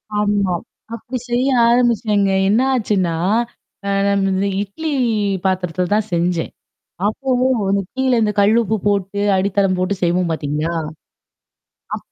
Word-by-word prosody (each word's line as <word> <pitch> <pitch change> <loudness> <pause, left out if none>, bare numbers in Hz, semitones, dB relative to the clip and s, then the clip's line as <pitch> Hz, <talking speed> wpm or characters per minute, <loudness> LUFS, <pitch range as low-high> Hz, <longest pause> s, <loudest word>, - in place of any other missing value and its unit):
ஆமா, 205 -3 +1 0.4
அப்படி 250 +3 -6
செய்ய 245 +2 +1 0.2
ஆரம்பிச்சேன்ங்க. 225 -5 +2 0.2
என்ன 220 +4 +3
ஆச்சுன்னா, 195 -8 0 0.7
அ, - - 0 0.2
நம்ம 195 0 +1
இட்லி 305 +11 -5 0.5
பாத்திரத்துல 180 -1 0
தான் 215 0 0
செஞ்சேன். 170 -1 0 0.6
அப்போ 265 +6 -4 0.7
கீழ 245 -5 +2
கல் 205 +3 +4
உப்பு 220 +1 -1
போட்டு, 200 0 -1 0.2
அடித்தளம் 195 -1 +1
போட்டுச் 185 +1 -2
செய்வோம் 175 0 +1
பார்த்தீங்களா? 155 +2 -2 1.2
அப்ப - - -13
200 Hz, 110 wpm, -19 LUFS, 185-220 Hz, 1.2 s, கல்